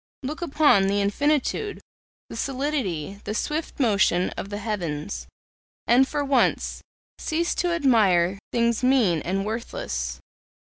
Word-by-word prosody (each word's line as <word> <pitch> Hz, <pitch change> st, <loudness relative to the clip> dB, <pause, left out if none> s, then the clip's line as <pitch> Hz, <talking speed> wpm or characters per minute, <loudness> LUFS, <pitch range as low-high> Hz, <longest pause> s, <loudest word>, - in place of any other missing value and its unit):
Look 300 Hz, +6 st, -4 dB
upon 290 Hz, -, +4 dB
the 200 Hz, +1 st, +1 dB
infinitude, 290 Hz, -, 0 dB, 0.5 s
the -, -, -9 dB
solidity, 230 Hz, -, -2 dB
the 210 Hz, -, -4 dB
swift 305 Hz, +6 st, -3 dB
motion, 200 Hz, -7 st, +2 dB
of 195 Hz, -, -6 dB
the 205 Hz, -, -4 dB
heavens, 155 Hz, -, -4 dB, 0.6 s
and 250 Hz, +4 st, +5 dB
for 290 Hz, 0 st, -2 dB
once 270 Hz, -2 st, +1 dB, 0.4 s
cease 335 Hz, +1 st, 0 dB
to 355 Hz, -1 st, 0 dB
admire 200 Hz, -, +3 dB
things 235 Hz, -1 st, +1 dB
mean 235 Hz, -, +3 dB
and 195 Hz, +2 st, -2 dB
worthless. 65 Hz, -, -4 dB
225 Hz, 125 wpm, -24 LUFS, 195-280 Hz, 0.6 s, and